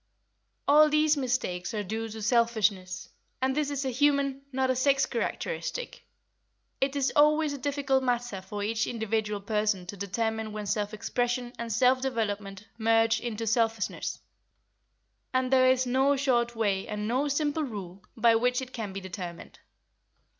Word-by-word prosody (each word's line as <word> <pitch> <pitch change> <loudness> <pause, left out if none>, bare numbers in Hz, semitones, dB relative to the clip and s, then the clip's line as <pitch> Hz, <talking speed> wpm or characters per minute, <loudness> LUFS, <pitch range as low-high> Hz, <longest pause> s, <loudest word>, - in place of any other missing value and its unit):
All 300 +2 +7
these 305 0 +3
mistakes 240 -8 -2
are 210 - -1
due 225 +3 -4
to 220 0 -7
selfishness, 215 -5 +1 0.3
and 260 0 0
this 300 -1 0
is 280 -1 -2
a 260 - 0
human, 280 +1 +2
not 260 0 +1
a - - 0
sex 275 +1 +3
characteristic. - - -3 0.8
It 270 +1 0
is 275 -2 +1
always 300 0 +4
a 285 - -6
difficult 275 -1 0
matter 245 -5 -1
for 205 +2 -5
each 220 +1 0
individual 220 -2 -2
person 210 -2 0
to 180 - -7
determine 220 +2 -2
when 210 -1 -5
self 205 +1 -1
expression 245 +2 -2
and 235 -1 -4
self 255 +4 +3
development 210 -6 -3
merge 225 0 +3
into 225 -1 -4
selfishness, 225 -1 0 1.2
and 255 0 +1
there 255 0 +6
is 260 0 +3
no 265 +3 +3
short 240 -3 +1
way 200 -4 0
and 210 0 -3
no 260 +5 +1
simple 295 +2 0
rule 200 - -6
by 230 0 +5
which 245 +2 +2
it 260 -1 -7
can 215 -5 -5
be 195 - -5
determined. 180 -2 -8
235 Hz, 155 wpm, -28 LUFS, 210-265 Hz, 1.2 s, All